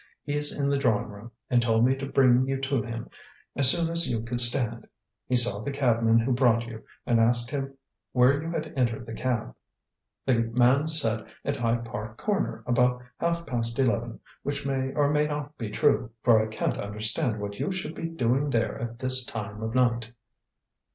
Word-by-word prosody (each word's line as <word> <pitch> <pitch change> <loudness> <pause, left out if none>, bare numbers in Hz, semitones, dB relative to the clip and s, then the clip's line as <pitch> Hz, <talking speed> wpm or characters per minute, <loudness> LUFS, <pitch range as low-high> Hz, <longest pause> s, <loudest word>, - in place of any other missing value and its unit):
He's 145 0 +2
in 140 - +1
the 140 - +1
drawing 110 -6 +1
room, 105 +3 -11 0.2
and 125 -2 +3
told 115 -1 +3
me 130 +1 +3
to 135 0 -5
bring 130 -1 +4
you 135 0 -1
to 135 -2 0
him 115 0 -6 0.5
as 140 -2 +6
soon 170 +4 +3
as 170 0 +2
you 115 -2 -1
could 120 +1 -2
stand. 120 -1 -1 0.4
He 125 - +1
saw 120 -5 +4
the 125 - -4
cabman 115 -5 +2
who 115 +3 +1
brought 120 -2 +3
you, 115 -1 -9 0.2
and 120 -2 +2
asked 120 +2 +3
him 135 -1 -4 0.3
where 130 +3 +4
you 165 - -5
had 165 -1 -4
entered 120 -3 0
the 115 - -8
cab. 115 - -2 0.7
The 125 -3 +2
man 125 +5 +2
said 115 -9 0 0.2
at 140 0 -1
Hyde 115 -1 0
Park 110 0 -7
Corner 205 -2 -2
about 125 0 +2 0.2
half 170 0 -1
past 115 -3 -3
eleven, 120 -3 0 0.2
which 140 0 -4
may 135 -1 -1
or 145 -1 +3
may 150 0 +2
not 145 0 -5
be 115 -3 -4
true, 140 +2 +1
for 115 -3 +5
I - - -3
can't 110 - -2
understand 110 +4 -1
what 100 0 -6
you 195 - -1
should 175 -4 -4
be 165 - -4
doing 135 -2 0
there 115 -4 -1
at 115 0 -5
this 130 0 +2
time 105 -3 -6
of 110 +2 -4
night." 120 -2 +1
125 Hz, 195 wpm, -27 LUFS, 115-140 Hz, 0.7 s, as